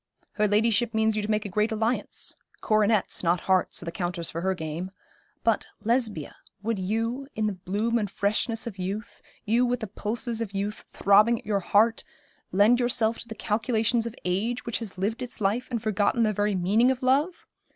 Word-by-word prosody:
Her 210 0 +1
ladyship 220 +2 +2
means 220 0 +2
you 215 - 0
to 210 - -4
make 215 0 +1
a - - -3
great 210 +3 +1
alliance 220 +3 -1 0.2
coronets, 215 -1 +2
not 170 0 +1
hearts, 185 -2 +1
are - - -8
the 170 - -4
counters 175 -1 -3
for 165 - -4
her 190 +1 0
game; 160 +2 -4 0.5
but, 225 -2 +1 0.2
Lesbia, 225 - -1 0.3
would 225 -1 -1
you, 225 +7 -2
in 215 - 0
the 210 - 0
bloom 205 +6 -1
and 205 -2 -2
freshness 215 +4 0
of 205 -5 -7
youth 195 +4 -5 0.2
you 230 +4 +3
with 245 0 +1
the - - -2
pulses 225 +3 -3
of 210 -3 -4
youth 205 +2 -3
throbbing 210 +4 +4
at - - -12
your 205 -1 +1
heart 220 +4 +3 0.5
lend 210 +6 +5
yourself 230 -2 +2
to - - -9
the 220 - -7
calculations 225 +1 0
of 235 - -7
age 210 +7 -1
which 235 - -2
has 215 -5 -6
lived 215 +7 -1
its 245 -1 -6
life 215 +5 0
and 235 -3 -3
forgotten 215 +2 +2
the 215 -1 +2
very 205 0 0
meaning 205 +7 +3
of 260 0 -1
love? 285 +7 +1
215 Hz, 195 wpm, -26 LUFS, 200-230 Hz, 0.5 s, lend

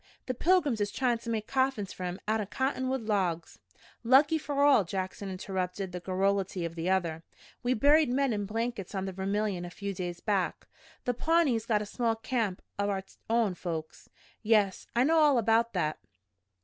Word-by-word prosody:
The 255 - -2
pilgrims 295 - +2
is 205 - +1
tryin' 245 -3 0
to 235 - -7
make 220 -2 -1
coffins 260 -6 0
fer 185 - -6
'em 180 +1 -4
out'n 215 -2 0
cottonwood 260 +1 -1
logs." 185 -6 -1 0.4
"Lucky 285 +6 +5
for 285 -2 0
all!" 285 -7 +6
Jackson 190 +2 -4
interrupted 185 0 -3
the 180 - -5
garrulity 190 0 0
of 165 - -4
the 165 +2 -2
other. 170 -4 0 0.4
"We 250 +1 +1
buried 295 +4 +5
men 265 0 +1
in 205 -1 -2
blankets 225 -2 -3
on 190 0 -2
the 190 - -3
Vermilion 195 0 -1
a 175 - -6
few 200 +3 -5
days 175 -2 -5
back. 195 -3 -1 0.4
The 245 - +1
Pawnees 275 -6 +2
got 210 -3 +2
a - - -7
small 230 +2 0
camp 225 -4 -2 0.2
o' 200 0 +1
our 195 -1 -1 0.3
own 225 -4 +2
folks." 165 -3 -6 0.3
"Yes, 210 -4 +2
I 240 - +4
know 320 +4 +4
all 295 -4 +5
about 230 +1 +2
that." 155 -5 -1
210 Hz, 180 wpm, -29 LUFS, 190-250 Hz, 0.4 s, all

